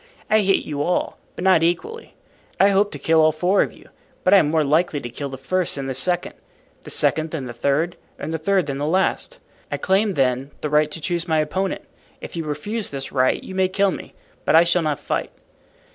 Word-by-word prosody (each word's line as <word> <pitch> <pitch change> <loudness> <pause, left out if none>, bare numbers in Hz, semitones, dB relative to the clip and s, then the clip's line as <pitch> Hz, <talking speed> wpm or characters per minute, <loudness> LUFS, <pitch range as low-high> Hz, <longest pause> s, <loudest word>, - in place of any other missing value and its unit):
I 215 - +6
hate 195 -1 +2
you 145 -2 -3
all, 180 +4 -1 0.2
but - - -5
not 185 -4 +5
equally. 435 - -2 0.4
I 195 - +6
hope 200 +1 +3
to 150 - -6
kill 160 +3 +3
all 155 0 +5
four 180 +6 +2
of - - 0
you, - - -18 0.3
but 185 - +4
I - - +9
am 155 -6 +3
more 160 0 +2
likely 155 +1 +1
to 120 -3 -7
kill 140 +3 -5
the 135 - -7
first 180 +6 -1
than 140 -1 -4
the 135 - -3
second, 175 +7 0 0.5
the - - -11
second 155 +1 +1
than 155 -5 -4
the 120 - -6
third, 140 +8 0 0.2
and 155 +3 -5
the 160 - -2
third 190 +1 +2
than 140 -1 -4
the 145 - -1
last. 190 - 0 0.3
I - - -1
claim, 195 +1 +1
then, 130 0 +1
the 150 - -3
right 150 0 +3
to 160 - -6
choose 175 +1 -1
my 160 -1 +2
opponent. 185 +6 -1 0.4
If - - -9
you 165 -1 -3
refuse 200 +9 -3
this 135 -1 -5
right 130 -1 +1
you - - -8
may 190 0 +2
kill 195 +1 +1
me, - - -8 0.3
but - - +3
I 165 - +8
shall 175 +1 +2
not 150 -4 -1
fight." - - -2
160 Hz, 230 wpm, -22 LUFS, 145-190 Hz, 0.5 s, I